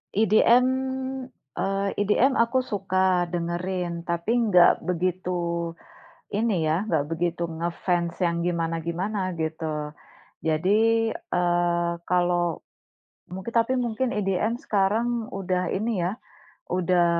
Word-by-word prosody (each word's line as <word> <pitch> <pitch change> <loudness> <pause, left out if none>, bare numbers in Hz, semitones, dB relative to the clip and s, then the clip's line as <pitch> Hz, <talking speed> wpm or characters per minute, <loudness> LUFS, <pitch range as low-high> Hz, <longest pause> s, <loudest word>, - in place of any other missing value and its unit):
EDM, 225 +4 +5 0.9
eee, 195 +1 0
EDM, 220 +6 +3
aku 255 +3 +2
suka 185 -4 +1
dengerin, 175 0 -3
tapi 170 +5 -1 0.2
nggak 180 -5 +5
begitu 175 -1 -1 0.6
ini 205 -6 +1
ya 165 +7 0
nggak 155 -4 +1
begitu 170 +1 -1
nge-fans 170 0 -1
yang 170 -1 +1
gimana-gimana 170 +3 -2
gitu. 160 -2 -3 0.6
Jadi, 220 +8 +3
eee, 175 -1 0
kalau, 175 -1 +1 0.7
mungkin 190 +5 -6
tapi 230 +2 +2
mungkin 240 +1 -1
EDM 210 +3 0
sekarang 225 +3 0
udah 185 -2 -1
ini 200 -3 -1
ya, 185 - -1 0.6
udah 180 -1 +2
180 Hz, 100 wpm, -25 LUFS, 170-210 Hz, 0.9 s, EDM